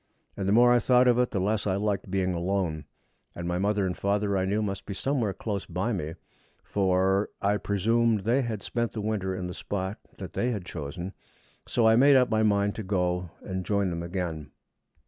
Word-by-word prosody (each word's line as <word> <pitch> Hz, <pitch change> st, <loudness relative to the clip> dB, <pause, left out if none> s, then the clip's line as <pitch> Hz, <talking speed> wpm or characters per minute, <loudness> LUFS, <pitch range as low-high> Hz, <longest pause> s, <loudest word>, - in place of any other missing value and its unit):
And 95 Hz, -, -3 dB
the -, -, +2 dB
more 120 Hz, +3 st, +6 dB
I 120 Hz, -, +5 dB
thought 125 Hz, +1 st, +4 dB
of 120 Hz, 0 st, +4 dB
it, 125 Hz, -, +2 dB
the 100 Hz, -, -2 dB
less 105 Hz, +2 st, 0 dB
I 95 Hz, -, +1 dB
liked 100 Hz, -1 st, -1 dB
being 95 Hz, -1 st, 0 dB
alone. 85 Hz, -3 st, -1 dB, 0.5 s
And 85 Hz, 0 st, -5 dB
my 90 Hz, 0 st, -1 dB
father 100 Hz, 0 st, +1 dB
and 90 Hz, -1 st, -4 dB
mother, 100 Hz, 0 st, +1 dB
I 95 Hz, -1 st, +1 dB
knew, 105 Hz, +3 st, 0 dB
must 100 Hz, -2 st, -4 dB
be 100 Hz, -, -4 dB
somewhere 125 Hz, -3 st, 0 dB
close 100 Hz, 0 st, -4 dB
by 90 Hz, +7 st, -1 dB
me 80 Hz, -4 st, -3 dB, 0.5 s
for 95 Hz, +1 st, +1 dB
I 100 Hz, +1 st, +1 dB
presumed 110 Hz, +2 st, +1 dB
they 120 Hz, +7 st, +2 dB
had 110 Hz, -5 st, -4 dB
spent 120 Hz, -1 st, -2 dB
the 110 Hz, -, -3 dB
winter 100 Hz, -3 st, -1 dB
in 90 Hz, 0 st, -4 dB
the 90 Hz, -, -5 dB
spot 95 Hz, +1 st, -4 dB, 0.2 s
that -, -, -8 dB
they 125 Hz, -, 0 dB
had 105 Hz, -7 st, -3 dB
chosen 85 Hz, +4 st, -6 dB, 0.5 s
so 115 Hz, -2 st, +2 dB
I 110 Hz, 0 st, +6 dB
made 140 Hz, +2 st, +6 dB
up 125 Hz, -2 st, +4 dB
my 110 Hz, 0 st, +3 dB
mind 100 Hz, -1 st, +2 dB
to 110 Hz, -, -4 dB
go 90 Hz, -2 st, -1 dB
and 95 Hz, -1 st, -4 dB
join 100 Hz, -1 st, 0 dB
them 85 Hz, 0 st, -3 dB
again. 85 Hz, -5 st, -4 dB
100 Hz, 210 wpm, -27 LUFS, 95-110 Hz, 0.5 s, more